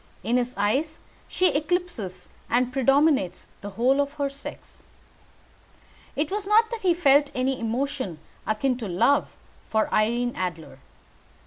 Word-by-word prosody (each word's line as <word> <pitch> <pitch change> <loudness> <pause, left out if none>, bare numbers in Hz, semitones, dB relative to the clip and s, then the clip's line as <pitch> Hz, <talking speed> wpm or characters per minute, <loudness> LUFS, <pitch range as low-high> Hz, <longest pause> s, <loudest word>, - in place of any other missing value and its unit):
In 235 +3 +1
his 250 0 -1
eyes 270 +11 0 0.3
she 365 0 +2
eclipses 290 - -2 0.2
and 250 +1 +1
predominates 270 - +2 0.2
the 205 - -6
whole 250 +7 +2
of 285 0 -3
her 285 -2 -2
sex. 280 +1 -11 1.3
It 295 +3 -1
was 405 -1 -2
not 445 +2 +4
that 465 -1 -4
he 360 -3 +3
felt 285 -3 +4
any 260 +1 0
emotion 230 - -2 0.3
akin 245 +4 0
to 230 -4 -5
love 190 +11 +2 0.3
for 220 -1 0
Irene 240 +3 +1
Adler. 175 -4 -5
265 Hz, 135 wpm, -25 LUFS, 220-295 Hz, 1.3 s, not